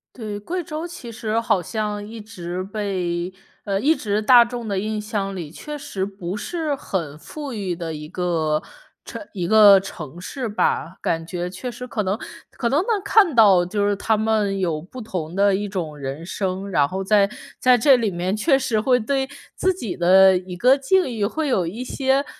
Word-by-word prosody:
对， 215 Hz, -4 st, -5 dB
贵 350 Hz, -, -4 dB
州 315 Hz, +2 st, -5 dB
其 250 Hz, -9 st, -9 dB
实 225 Hz, -1 st, -1 dB
好 225 Hz, -5 st, +1 dB
像 210 Hz, +2 st, -3 dB
一 225 Hz, +2 st, -9 dB
直 185 Hz, -4 st, -6 dB
被 185 Hz, -3 st, -2 dB, 0.3 s
呃， 195 Hz, -2 st, 0 dB
一 300 Hz, +9 st, +3 dB
直 210 Hz, -4 st, -1 dB
大 240 Hz, +2 st, +8 dB
众 235 Hz, -1 st, -6 dB
的 200 Hz, -2 st, -1 dB
印 215 Hz, +2 st, -2 dB
象 205 Hz, -2 st, -3 dB
里 165 Hz, -5 st, -6 dB
确 300 Hz, -, -7 dB
实 275 Hz, -10 st, -4 dB
不 195 Hz, -2 st, -6 dB
是 310 Hz, +7 st, -2 dB
很 170 Hz, -, -4 dB
富 290 Hz, -, -7 dB
裕 195 Hz, -5 st, -3 dB
的 165 Hz, -2 st, -5 dB
一 150 Hz, 0 st, -7 dB
个 160 Hz, -4 st, 0 dB, 0.4 s
城 -, -, -7 dB
一 180 Hz, -4 st, -3 dB
个 205 Hz, -1 st, +8 dB
城 170 Hz, -5 st, -8 dB
市 250 Hz, +7 st, -5 dB
吧。 190 Hz, -4 st, -1 dB
感 165 Hz, 0 st, -1 dB
觉 175 Hz, +1 st, -4 dB
确 250 Hz, +7 st, -6 dB
实 245 Hz, +1 st, -7 dB
可 235 Hz, -3 st, -2 dB
能 195 Hz, +2 st, -1 dB, 0.3 s
可 235 Hz, -, -2 dB
能 280 Hz, -, +3 dB
能 420 Hz, 0 st, 0 dB
看 390 Hz, -, +4 dB
到 200 Hz, -6 st, +6 dB
就 205 Hz, +2 st, 0 dB
是 205 Hz, -, +1 dB
他 215 Hz, +2 st, +1 dB
们 215 Hz, -2 st, +1 dB
有 165 Hz, -5 st, -1 dB
不 195 Hz, +9 st, -11 dB
同 180 Hz, -7 st, -5 dB
的 200 Hz, 0 st, +4 dB
一 205 Hz, +2 st, -1 dB
种 170 Hz, -6 st, -4 dB
人 140 Hz, +3 st, -5 dB
生， 190 Hz, +1 st, -3 dB
然 145 Hz, -5 st, +3 dB
后 190 Hz, +3 st, -4 dB
在 200 Hz, 0 st, +4 dB, 0.3 s
在 255 Hz, -1 st, +5 dB
这 265 Hz, +4 st, +6 dB
里 230 Hz, -3 st, 0 dB
面 180 Hz, +1 st, -2 dB
确 270 Hz, +6 st, +3 dB
实 230 Hz, -5 st, 0 dB
会 250 Hz, +1 st, +3 dB
对 265 Hz, +3 st, -1 dB, 0.3 s
自 375 Hz, -, +2 dB
己 235 Hz, -, -5 dB
的 190 Hz, +2 st, +6 dB
一 180 Hz, 0 st, -7 dB
个 255 Hz, +7 st, +5 dB
境 360 Hz, +7 st, +2 dB
遇 215 Hz, -3 st, 0 dB
会 315 Hz, +8 st, -2 dB
有 190 Hz, -10 st, +1 dB
一 220 Hz, +9 st, -5 dB
些 265 Hz, +2 st, +1 dB
205 Hz, 215 characters per minute, -22 LUFS, 180-245 Hz, 0.4 s, 大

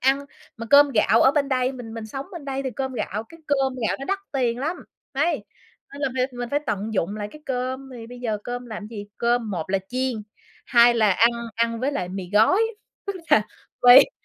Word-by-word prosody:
ăn. 270 Hz, +2 st, +3 dB, 0.4 s
Mà 230 Hz, 0 st, -6 dB
cơm 285 Hz, 0 st, +8 dB
gạo 225 Hz, -2 st, +3 dB
ở 265 Hz, -, +6 dB
bên 280 Hz, -2 st, +1 dB
đây, 255 Hz, 0 st, +1 dB
mình 240 Hz, -4 st, -8 dB
mình 225 Hz, -1 st, -6 dB
sống 270 Hz, +5 st, -6 dB
bên 340 Hz, -5 st, -8 dB
đây 275 Hz, -1 st, -3 dB
thì 265 Hz, -, -2 dB
cơm 265 Hz, +1 st, -4 dB
gạo 220 Hz, -3 st, -3 dB
cái 330 Hz, -, -15 dB
cơm 270 Hz, -2 st, +1 dB
gạo -, -, 0 dB
nó 275 Hz, -, -6 dB
đắt 390 Hz, +6 st, -1 dB
tiền 245 Hz, -4 st, 0 dB
lắm. 315 Hz, +7 st, -2 dB, 0.4 s
Đấy, 315 Hz, +6 st, 0 dB, 0.5 s
nên 285 Hz, -, -8 dB
là 275 Hz, -, +2 dB
phải 255 Hz, 0 st, +2 dB
mình 245 Hz, -1 st, -5 dB
phải 285 Hz, -, +1 dB
tận 210 Hz, 0 st, -2 dB
dụng 195 Hz, +2 st, -1 dB
lại 205 Hz, -1 st, -4 dB
cái 305 Hz, -, -13 dB
cơm, 260 Hz, +1 st, -3 dB
thì 230 Hz, -2 st, -9 dB
bây 245 Hz, +1 st, -11 dB
giờ 220 Hz, -4 st, -1 dB
cơm 245 Hz, 0 st, -5 dB
làm 215 Hz, -2 st, -7 dB
gì? 210 Hz, -2 st, -8 dB
Cơm 235 Hz, -2 st, +1 dB
một 175 Hz, -2 st, -4 dB
là 195 Hz, -, +2 dB
chiên, 255 Hz, -3 st, -2 dB, 0.4 s
hai 240 Hz, 0 st, +6 dB
là 215 Hz, -3 st, +4 dB
ăn 230 Hz, +6 st, +5 dB, 0.2 s
ăn 230 Hz, 0 st, 0 dB
với 275 Hz, +3 st, 0 dB
lại 180 Hz, -9 st, -2 dB
mì 185 Hz, -1 st, -6 dB
gói, 220 Hz, -, +5 dB, 0.5 s
tức 400 Hz, -, -2 dB, 0.2 s
là 215 Hz, -, +6 dB, 0.4 s
quây 250 Hz, -, +9 dB
245 Hz, 225 wpm, -24 LUFS, 220-270 Hz, 0.5 s, quây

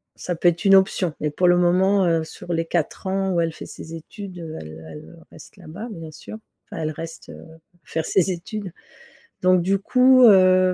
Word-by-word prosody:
ça 175 Hz, -, -4 dB
peut 175 Hz, +1 st, +3 dB
être 170 Hz, +3 st, -4 dB
une 195 Hz, 0 st, +7 dB
option 190 Hz, -4 st, +2 dB
mais 150 Hz, -1 st, -1 dB
pour 180 Hz, +4 st, +1 dB
le 175 Hz, 0 st, +5 dB
moment, 185 Hz, +2 st, +3 dB
heu, 165 Hz, -2 st, +1 dB
sur 175 Hz, +1 st, -7 dB
les 165 Hz, 0 st, -1 dB
4 170 Hz, +2 st, -3 dB
ans 190 Hz, 0 st, -1 dB
où 170 Hz, -, +1 dB
elle 165 Hz, -1 st, -1 dB
fait -, -, -10 dB
ses 165 Hz, +1 st, -9 dB
études 185 Hz, +3 st, -10 dB, 0.2 s
elle 80 Hz, +1 st, -11 dB
elle 75 Hz, -, -12 dB
reste -, -, -15 dB
là-bas, 200 Hz, +9 st, -9 dB
bien 165 Hz, -4 st, -9 dB
sûr, 215 Hz, +7 st, -10 dB, 0.3 s
enfin 160 Hz, -, -5 dB
elle 155 Hz, -, -2 dB
reste 165 Hz, +1 st, -9 dB, 0.5 s
faire 160 Hz, 0 st, -3 dB
ses 190 Hz, -1 st, +1 dB
études. 190 Hz, +2 st, -6 dB, 0.7 s
Donc 185 Hz, -1 st, +4 dB
du 195 Hz, +2 st, +1 dB
coup, 255 Hz, +3 st, +4 dB
heu, 185 Hz, -3 st, +5 dB
180 Hz, 195 wpm, -22 LUFS, 165-195 Hz, 0.7 s, une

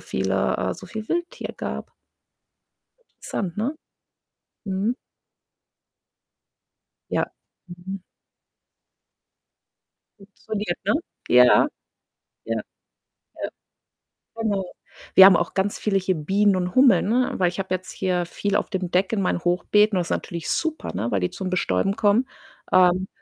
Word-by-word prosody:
viele -, -, -1 dB
äh, -, -, -2 dB
so -, -, -11 dB
viel 220 Hz, -1 st, -6 dB
Wildtier 345 Hz, +1 st, -3 dB
gab. -, -, -5 dB, 1.1 s
Interessant, 190 Hz, -4 st, -5 dB
ne? 225 Hz, +6 st, 0 dB, 1.0 s
Mhm. 195 Hz, +5 st, 0 dB, 2.2 s
Ja. -, -, +1 dB, 0.4 s
Mhm. 180 Hz, +2 st, -8 dB, 2.2 s
Funktioniert, 205 Hz, -1 st, -5 dB
ne? 205 Hz, -, +2 dB, 0.3 s
Ja, 125 Hz, 0 st, +7 dB
ja, 125 Hz, -, +5 dB, 0.8 s
ja, 115 Hz, -1 st, -2 dB, 0.8 s
ja, -, -, -2 dB, 0.9 s
genau. 215 Hz, -4 st, -1 dB, 0.5 s
Wir 190 Hz, -, +11 dB
haben 190 Hz, -1 st, +8 dB
auch 175 Hz, -, -2 dB
ganz 200 Hz, +1 st, 0 dB
viele 205 Hz, -2 st, +1 dB
hier 190 Hz, -1 st, 0 dB
Bienen 195 Hz, +6 st, +2 dB
und 180 Hz, 0 st, -2 dB
Hummeln, 255 Hz, -10 st, +5 dB
ne, 250 Hz, +2 st, +1 dB
weil 180 Hz, -, +3 dB
ich 175 Hz, -, -9 dB
habe 190 Hz, -1 st, -2 dB
jetzt 185 Hz, 0 st, -4 dB
hier 180 Hz, -1 st, -1 dB
viel 200 Hz, +3 st, -2 dB
auf -, -, 0 dB
dem 185 Hz, -4 st, -3 dB
Deck 185 Hz, +2 st, +2 dB
in 210 Hz, -, +1 dB
meinen 180 Hz, -, 0 dB
Hochbeeten. 200 Hz, +4 st, +3 dB
Das 175 Hz, -2 st, -1 dB
ist -, -, -5 dB
natürlich 170 Hz, -2 st, -3 dB
super, 320 Hz, -1 st, -2 dB
ne, 110 Hz, +6 st, -2 dB
weil 100 Hz, -, +1 dB
die 90 Hz, -, 0 dB
zum 190 Hz, -1 st, -4 dB
Bestäuben 185 Hz, -, 0 dB
kommen. 225 Hz, +3 st, +2 dB, 0.4 s
Ähm, 185 Hz, +1 st, +4 dB
190 Hz, 130 wpm, -23 LUFS, 180-210 Hz, 2.2 s, Wir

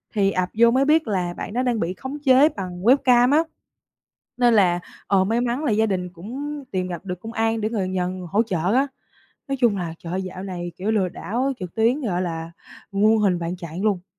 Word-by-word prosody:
thì 195 Hz, -1 st, +3 dB
ập 185 Hz, -1 st, -1 dB
vô 235 Hz, 0 st, +6 dB
mới 265 Hz, +2 st, +3 dB
biết 305 Hz, -2 st, +3 dB
là 180 Hz, -4 st, -1 dB
bạn 205 Hz, -, -6 dB
đó 250 Hz, -, 0 dB
đang 245 Hz, -4 st, 0 dB
bị 170 Hz, +2 st, -1 dB
khống 265 Hz, +7 st, -6 dB
chế 270 Hz, +3 st, +6 dB
bằng 180 Hz, -, -6 dB
webcam 250 Hz, 0 st, +5 dB
á. 320 Hz, +2 st, +5 dB, 0.9 s
Nên 240 Hz, -2 st, +4 dB
là, 180 Hz, -4 st, +4 dB, 0.3 s
ờ, 190 Hz, -1 st, +3 dB
may 225 Hz, +4 st, 0 dB
mắn 245 Hz, +4 st, -1 dB
là 270 Hz, -, +1 dB
gia 220 Hz, +1 st, +3 dB
đình 185 Hz, -4 st, -2 dB
cũng 270 Hz, -, -6 dB
tìm 185 Hz, -1 st, -1 dB
gặp 180 Hz, +2 st, -6 dB
được 180 Hz, -1 st, -5 dB
công 225 Hz, +1 st, -7 dB
an 225 Hz, 0 st, 0 dB
để 215 Hz, -, 0 dB
người 205 Hz, -5 st, -1 dB
nhờ 180 Hz, -1 st, -1 dB
người 185 Hz, -1 st, -6 dB
hỗ 220 Hz, +3 st, +3 dB
trợ 185 Hz, -1 st, -1 dB
á, 275 Hz, +2 st, +3 dB, 0.6 s
nói 275 Hz, -, -1 dB
chung 230 Hz, -5 st, +3 dB
là, 170 Hz, -3 st, -4 dB
trời 170 Hz, 0 st, -7 dB
ơi, 190 Hz, -, -1 dB
dạo 185 Hz, 0 st, -7 dB
này, 175 Hz, -2 st, -5 dB
kiểu, 200 Hz, +4 st, -2 dB
lừa 200 Hz, -4 st, +1 dB
đảo 250 Hz, +10 st, -2 dB
trực 180 Hz, -2 st, -6 dB
tuyến, 235 Hz, +6 st, +2 dB
gọi 185 Hz, -6 st, -1 dB
là, 165 Hz, -2 st, -4 dB, 0.4 s
muôn 215 Hz, +3 st, +4 dB
hình 195 Hz, -4 st, +2 dB
vạn 170 Hz, +1 st, -3 dB
trạng 170 Hz, +3 st, -6 dB
luôn. 190 Hz, -4 st, +1 dB
200 Hz, 235 wpm, -23 LUFS, 180-240 Hz, 0.9 s, vô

